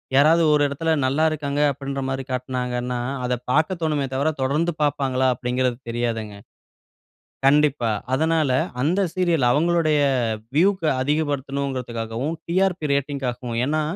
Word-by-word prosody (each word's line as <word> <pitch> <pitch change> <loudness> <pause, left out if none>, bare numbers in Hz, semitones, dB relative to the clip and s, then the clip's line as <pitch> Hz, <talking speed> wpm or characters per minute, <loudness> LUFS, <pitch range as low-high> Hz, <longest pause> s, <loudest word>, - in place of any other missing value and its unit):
யாராவது 160 +4 +5
ஒரு 150 - +3
இடத்தில 160 +4 -2
நல்ல 140 +5 +2
இருக்காங்க 145 -2 -2
அப்பிடின்றமாரி 135 -1 -4
காட்டினாங்கன்னா, 125 -1 -2 0.2
அத 125 0 0 0.2
பார்க்க 160 +6 +1
தோணுமே 150 -3 0
தவிர, 140 +4 +1
தொடர்ந்து 150 +6 +1
பார்ப்பாங்களா? 135 -3 +1
அப்பிடிங்கிறது 125 0 -1
தெரியாதுங்க. 115 -3 -3 1.1
கண்டிப்பா. 140 -4 +3 0.2
அதனால 160 0 +2 0.3
அந்த 170 +8 +1
சீரியல், 170 -7 +2
அவுங்களுடைய 155 +1 +2 0.6
வியூக்கு 185 +1 +3
அதிகப்படுத்தணும்கிறதுக்காகவும், 135 -3 -2
டிஆர்பி 180 -2 +1
ரேட்டிங்‌க்காகவும் 130 -4 -2
ஏன்னா, 155 +3 0
140 Hz, 105 wpm, -23 LUFS, 125-155 Hz, 1.1 s, யாராவது